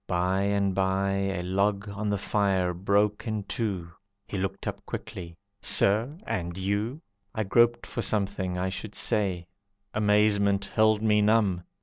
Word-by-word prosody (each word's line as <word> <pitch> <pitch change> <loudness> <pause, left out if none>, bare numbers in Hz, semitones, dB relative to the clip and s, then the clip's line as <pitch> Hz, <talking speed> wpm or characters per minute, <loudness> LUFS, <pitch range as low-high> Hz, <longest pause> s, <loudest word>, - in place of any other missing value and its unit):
By 90 +2 +1
and 100 -1 +1
by 95 +1 +1
A 95 -2 -1
log 100 +3 0
on 105 +1 -3
the 100 - +1
fire 95 -3 +1
broke 100 +4 +1
in 110 -2 -2
two. 95 -5 -3 0.3
He - - -7
looked 95 0 -3
up - - -5
quickly, 85 -1 -7 0.2
"Sir, 110 +9 +3
and 85 -1 -3
you?" 105 - -2 0.3
I 110 - 0
groped 120 +4 +3
for 120 - -4
something 100 -4 -1
I 95 +1 -1
should 105 +2 -6
say; 95 -6 0 0.5
Amazement 105 -1 +3
held 110 0 +3
me 105 -1 +4
numb. 105 -5 +2
100 Hz, 145 wpm, -27 LUFS, 95-105 Hz, 0.5 s, me